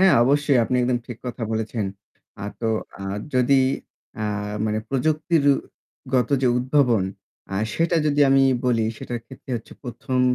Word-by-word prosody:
হ্যাঁ 190 -2 +6
অবশ্যই। 140 0 +3
আপনি 125 +3 0
একদম 125 0 +1
ঠিক 120 -2 -7
কথা 120 -1 -5
বলেছেন। 110 -1 -2 0.6
আ - - -3 0.2
তো 115 - 0 0.7
যদি 130 +2 +4 0.6
আ - - 0 0.4
মানে 110 0 0
প্রযুক্তিরগত 140 -3 0
যে 125 - +4
উদ্ভাবন 125 -6 +3 0.5
আ - - -1 0.2
সেটা 170 +1 +2
যদি 145 0 +2
আমি 135 0 +5 0.2
বলি, 115 -3 +2
সেটার 120 +1 -5
ক্ষেত্রে 130 0 -12
হচ্ছে 115 - -10
১ম 125 0 -2
125 Hz, 140 wpm, -23 LUFS, 120-145 Hz, 0.7 s, হ্যাঁ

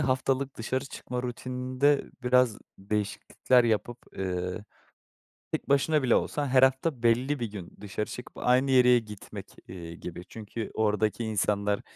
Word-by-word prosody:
haftalık 130 +1 0
dışarı 130 +3 -2
çıkma 125 -2 -5
rutininde 130 +3 0
biraz 125 -3 +3 0.2
değişiklikler 105 +5 +1
yapıp, 115 +1 0 0.2
eee, 90 +1 -3 0.9
tek - - -3
başına 140 +2 +3
bile 125 - +4
olsan 145 -1 0
her 130 0 +5
hafta 130 0 +2
belli 125 +5 +2
bir 115 -3 -3
gün 95 -5 -8
dışarı 105 +1 -3
çıkıp 125 - -9
aynı 130 +2 +3
yeriye 125 -1 +6
gitmek, 105 -3 -9 0.2
eee, 85 -2 -8
gibi. 85 0 -7
Çünkü 110 0 -6
oradaki 110 +1 +1
insanlar 105 -1 0
120 Hz, 135 wpm, -28 LUFS, 105-130 Hz, 0.9 s, yeriye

